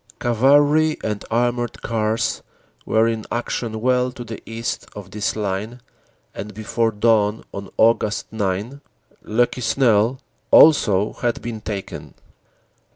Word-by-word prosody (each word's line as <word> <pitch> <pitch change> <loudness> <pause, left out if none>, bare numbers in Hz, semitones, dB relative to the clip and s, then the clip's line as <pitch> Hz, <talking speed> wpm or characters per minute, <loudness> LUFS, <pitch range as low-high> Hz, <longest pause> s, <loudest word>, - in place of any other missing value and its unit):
Cavalry 145 +5 +3
and 105 -2 -3
armored 120 +1 -1
cars 110 -1 -1 0.5
were 110 +1 +3
in 115 -1 -2
action 115 -2 -3
well 125 +1 +2
to 125 -1 -8
the 115 -2 -8
east 115 +1 -4
of 100 -2 -9
this 105 -1 -2
line 105 +3 -3 0.5
and 105 0 -7
before 115 +1 0
dawn 105 0 +2
on 100 -1 -7
Aug. 110 -2 +2
9 105 +6 -3 0.4
Le 115 +3 +2
Quesnel 120 -1 +1 0.3
also 105 -10 +5
had 120 -1 -2
been 115 -2 -5
taken. 100 -2 -6
115 Hz, 120 wpm, -21 LUFS, 105-120 Hz, 0.5 s, also